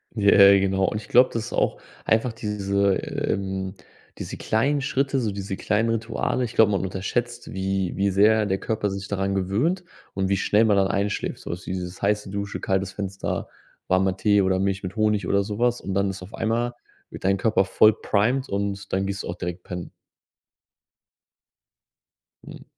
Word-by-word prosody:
J 100 -2 +4 0.2
ja, - - +4
genau. 95 0 +1
Und 105 - -1
ich 105 - -8
glaube, 125 +1 +5
das 115 0 -2
ist - - -8
auch - - 0 0.3
einfach 115 +1 +2
diese, 100 -3 0
ähm 95 0 -3 0.4
diese - - -6
kleinen 140 +6 +1
Schritte, 135 -1 0
so 110 -4 -1
diese 95 -1 -5
kleinen 110 +2 0
Rituale 115 +2 -1
ich 110 - -7
glaube, 110 -2 +5
man 100 - +1
unterschätzt, 100 +6 -3
wie 95 -1 -2
wie 100 0 +2
sehr 105 +2 +4
der 95 -1 -1
Körper 105 -3 -2
sich 95 0 -5
daran 95 -1 -1
gewöhnt 115 - 0 0.3
und 95 0 -1
wie 100 - +2
schnell 105 +2 +3
man 105 -2 +3
dann 95 -1 +3
einschläft, 100 +1 -2
sowas 90 +2 -7
wie - - -5
dieses 90 -1 -5
heiße 105 0 0
Dusche, 100 +1 -4
kaltes 95 -1 -1
Fenster, 95 -1 -4 0.4
warmer 95 0 +2
Tee 100 0 +3
oder 95 0 +1
Milch 95 0 -1
mit 95 +4 -5
Honig 105 -3 +1
oder 100 0 +2
sowas 120 +4 0
und 95 -1 -4
dann 100 0 +1
ist 95 - -9
auf 90 +4 -9
einmal 120 +2 -1 0.4
wird - - -10
dein 95 +1 +2
Körper 110 -1 +2
voll 110 +2 +5
primed 125 +6 +1
und 100 0 -3
dann 95 +1 0
gehst 100 0 -4
du - - -6
auch 85 - -3
direkt 90 0 -5
pennen. 90 -1 -7 2.6
Mhm. - - -10
100 Hz, 185 wpm, -24 LUFS, 95-110 Hz, 2.6 s, glaube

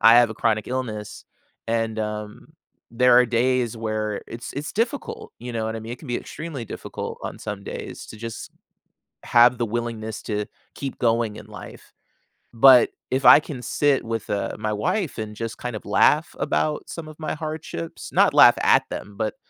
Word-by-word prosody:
I 115 +1 +8
have 120 -2 +6
a - - -5
chronic 110 -2 0
illness 115 -5 -4 0.4
and, 115 -1 -1
um, 105 -1 -5 0.4
there 125 +1 +5
are 125 - +5
days 120 0 +1
where 110 -2 -2
it's 120 +1 -7
it's 145 +2 -5
difficult, 235 +6 -3
you 120 0 -6
know 110 -1 -2
what 110 0 -3
I 110 - -6
mean? 115 +2 -7
It 125 - -7
can 145 - -11
be 120 - 0
extremely 155 -7 -6
difficult - - -6
on - - -6
some 105 -1 -6
days - - -7
to - - -10
just, 115 +1 -7 0.7
have 120 +1 +5
the 120 - 0
willingness 115 -1 -4
to 105 -1 -2 0.3
keep 135 -2 -5
going 115 -3 +1
in - - -10
life. - - -12 0.6
But 125 +1 +7 0.2
if 130 +1 0
I - - +10
can 145 -4 -7
sit 145 +2 +1
with, 115 -2 -4
uh, 100 -1 -2
my 105 0 -2
wife 155 - -1
and 105 -1 -5
just 115 0 -5
kind 125 -2 -4
of - - -7
laugh - - +3
about 75 0 -1
some 165 -2 -7
of 155 - -13
my 155 - -3
hardships, 155 - -6
not - - +4
laugh - - +8
at - - +5
them 100 0 -7
but 110 -1 -2
115 Hz, 190 wpm, -23 LUFS, 110-125 Hz, 0.7 s, I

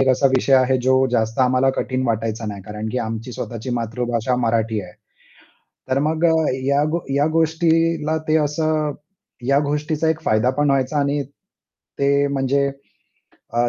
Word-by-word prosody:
एक 135 - +3
असा 130 +2 +4
विषय 130 +1 +1
आहे 130 0 +4
जो 130 - +5 0.2
जास्त 115 -1 0
आम्हाला 130 +1 +3
कठीण 130 0 -1
वाटायचा 115 0 -2
नाही. 100 -2 -6
कारण 105 +2 -6
की 125 - 0
आमची 115 +1 -4
स्वतःची 115 +2 -6
मातृभाषा 120 +1 -1
मराठी 115 -1 0
आहे. 90 -2 -11 1.0
तर 130 - +2
मग 160 +2 +1
अ, 165 -1 +4 0.3
या 140 +1 +3
ग 170 - +1 0.2
या 140 +1 +3
गोष्टीला 160 -1 +1
ते 155 - +2
असं 155 0 0 0.6
या 140 +1 +4
गोष्टीचा 150 +2 -1
एक 160 0 -1
फायदा 110 +3 +2
पण 145 -1 +2
व्हायचा 135 +2 +1
आणि 140 +1 0 0.8
ते 140 0 +3
म्हणजे 140 0 +1 0.9
अ, 120 0 +2
135 Hz, 160 wpm, -21 LUFS, 115-150 Hz, 1.0 s, जो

